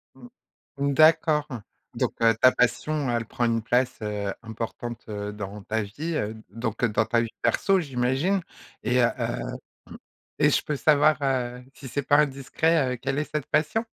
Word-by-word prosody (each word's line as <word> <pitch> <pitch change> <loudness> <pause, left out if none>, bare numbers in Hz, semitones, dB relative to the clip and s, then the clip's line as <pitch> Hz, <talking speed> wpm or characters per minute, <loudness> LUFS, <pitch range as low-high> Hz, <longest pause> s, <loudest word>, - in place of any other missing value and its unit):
Mmh 245 - -14 0.6
d'accord, 155 0 +4 0.5
donc, - - -1
heu, 115 0 +5
ta 130 +1 +7
passion, 135 +3 0
elle 115 -1 -1
prend 120 0 -2
une 115 -1 +1
place, 125 +2 +1
heu, 105 -2 -2
importante, 115 +1 -6
heu, 105 0 -4
dans 105 0 -7
ta 110 +2 -1
vie. 145 +12 -4
Heu, 110 -4 -3
donc, 115 +4 -4
heu, 120 - +4
dans 105 +1 +1
ta 120 - +2
vie 115 - -1
perso, 195 -1 +2
j'imagine 135 +7 0 0.4
et 125 +1 +2
heu 120 - +5
heu, - - -2 1.0
et - - +5
je - - +3
peux 150 - -3
savoir, 150 +1 +4
heu, 125 -2 -1
si 135 - -11
c'est 140 +3 -2
pas 145 - +4
indiscret, 140 0 +1
heu, - - -5
quelle 135 +2 -2
est 150 0 -2
cette 150 -3 -1
passion? 155 +10 +1
125 Hz, 175 wpm, -25 LUFS, 115-150 Hz, 1.0 s, ta